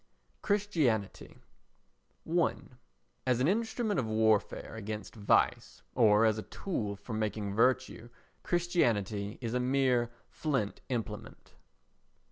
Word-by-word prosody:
Christianity 165 - 0 0.9
i 170 +1 +2 0.7
As 125 -2 +3
an 130 - +2
instrument 220 - 0
of 120 - -1
warfare 110 -1 +1
against 110 -1 -6
vice, 105 -3 +1
or 110 -2 +5
as 110 -1 +2
a - - -9
tool 105 - -3
for 110 +3 -8
making 105 -2 -2
virtue, 125 0 +1 0.3
Christianity 115 - 0
is 115 -1 -3
a 125 - +1
mere 125 -2 +2 0.2
flint 135 -10 -2
implement. 115 -4 -5
115 Hz, 105 wpm, -31 LUFS, 105-140 Hz, 0.9 s, or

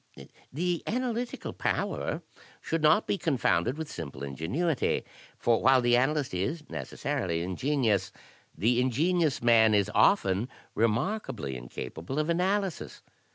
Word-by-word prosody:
"The 175 +4 -1
analytical 245 0 -2
power - - -2 0.4
should 165 0 -2
not 155 +7 +4
be 200 - -1
confounded 130 - +1
with 160 -1 -4
simple 70 - -7
ingenuity; 105 - -1 0.3
for 115 -1 +2
while 130 0 +5
the 120 -1 +3
analyst 135 +1 +1
is 150 - -2
necessarily 95 - -2
ingen 130 +10 -1
ious, 105 -3 +1 0.5
the 120 +3 +2
ingenious 155 +3 +1
man 110 -2 +5
is 100 0 +2
often 110 - +3 0.2
remarkably 115 - -1
incapable 65 - -6
of 155 +2 +1
analysis. 190 +1 -1
130 Hz, 120 wpm, -28 LUFS, 105-165 Hz, 0.5 s, while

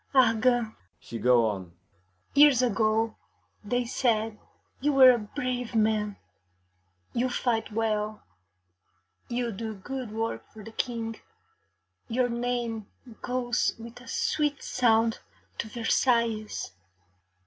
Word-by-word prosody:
Argand,' 240 -2 +4 0.3
she 115 - -7
go 120 -1 +4
on, 95 -5 -4 0.6
'years 280 -3 +6
ago, 220 -1 +1 0.5
they 245 +4 0
said 225 -3 0 0.4
you 290 +2 +1
were 260 -2 +9
a 240 - +1
brave 245 +1 -4
man; 215 -2 +1 1.0
you 250 +2 +1
fight 230 -3 -1
well, 215 -1 -1 1.1
you 240 -1 -1
do 220 +1 -5
good 250 +4 -6
work 225 +1 -3
for 215 - -11
the 225 - -9
King, 225 -1 -3 0.9
your 245 +1 +1
name 235 -3 -2 0.3
goes 245 -1 0
with 235 +2 -10
a 255 - -15
sweet 295 -2 0
sound 225 -2 +2 0.4
to - - -2
Versailles. 230 - 0
230 Hz, 110 wpm, -28 LUFS, 215-245 Hz, 1.1 s, were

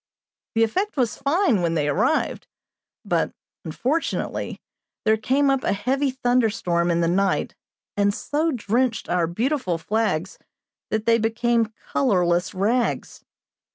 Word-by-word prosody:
The 225 - +4
effect 375 - -1
was 240 -5 +1
fine 280 - +2
when 170 -1 0
they 150 -2 +1
arrived; 145 - 0 0.6
but, - - 0 0.3
unfortunately, 255 - -2 0.5
there 220 0 +5
came 270 +6 +2
up 270 -1 0
a - - +1
heavy 270 +7 0
thunderstorm 225 -9 +1
in 170 0 +2
the 165 - +2
night 190 +3 +1 0.4
and 200 0 +3
so 300 +9 -1
drenched 240 0 0
our 175 -2 +1
beautiful 220 - -1
flags 190 -2 -1 0.5
that 220 0 -1
they 230 0 +4
became 230 0 +1 0.2
colorless 180 -7 +2
rags. 230 +6 -1
225 Hz, 125 wpm, -23 LUFS, 185-255 Hz, 0.6 s, there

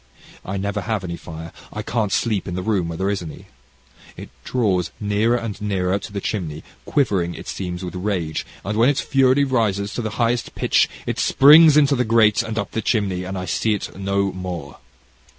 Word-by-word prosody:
I 95 +1 -4
never 100 +1 -2
have 110 -3 -2
any 85 -2 -4
fire. 80 0 -9 0.2
I - - -5
can't 110 -4 -1
sleep 105 -3 0
in 90 - -4
the 95 - -3
room 100 -5 0
where 85 -1 -5
there 95 +3 0
is 100 - -2
any, 80 -3 -9 0.7
and - - -7
it - - -20
draws 95 - 0
nearer 105 +3 +1
and 115 -4 -5
nearer 95 -2 0
to 105 - -9
the 100 - -3
chimney, 85 -7 -4 0.2
quivering, 95 -11 0
it - - -10
seems, 90 -1 -4
with 90 - -6
rage, 90 -4 -2 0.2
and 105 +2 -2
when 120 +4 +5
its 145 - +1
fury 135 0 +3
rises 105 -7 0
to - - -3
the 110 - -3
highest 120 0 0
pitch, - - +2 0.2
it - - -3
springs 150 +2 +7
into 140 -1 +4
the 125 - +1
grate, 110 -2 +4
and 115 -1 -5
up 100 -1 -2
the 110 - -2
chimney, 100 -5 0
and 95 +1 -5
I 90 - -4
see 110 +3 0
it 100 - -6
no 100 0 0
more. 90 -6 -6
100 Hz, 205 wpm, -21 LUFS, 90-115 Hz, 0.7 s, springs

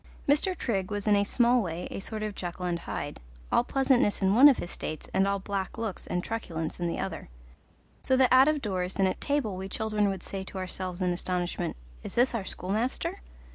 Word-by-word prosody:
Mr. 320 +6 +3
Trigg 195 -6 -1
was 205 -1 -3
in 210 -1 +5
a 200 - +3
small 240 +3 +3
way 175 -2 -4
a - - -4
sort 215 +2 -5
of 215 -1 -3
Jekyll 180 -1 -5
and 175 -1 -1
Hyde, - - -5 0.3
all - - +4
pleasantness 260 -5 +2
in 195 0 +3
one 265 +6 +9
of 270 - +3
his 175 - -5
states 155 - -5
and 190 +1 +3
all 200 0 +1
black 195 0 -4
looks 225 -4 -4
and 180 0 -1
truculence 170 -9 -4
in 175 - 0
the 170 - -2
other; - - -4 0.7
so 260 - +2
that 255 -1 +5
out 260 +2 +8
of 305 -2 +1
doors 185 -3 -2
and 195 -1 +3
at 185 - -3
table 280 -9 0
we 190 +1 -5
children 215 -1 0
would 190 -2 -4
say 195 -1 -5
to 190 - -8
ourselves 185 0 -3
in 180 - +2
astonishment, 175 - -2 0.2
"Is - - -7
this 245 +2 +3
our 220 -5 -2
schoolmaster?" 215 +8 -2
200 Hz, 215 wpm, -28 LUFS, 185-235 Hz, 0.7 s, one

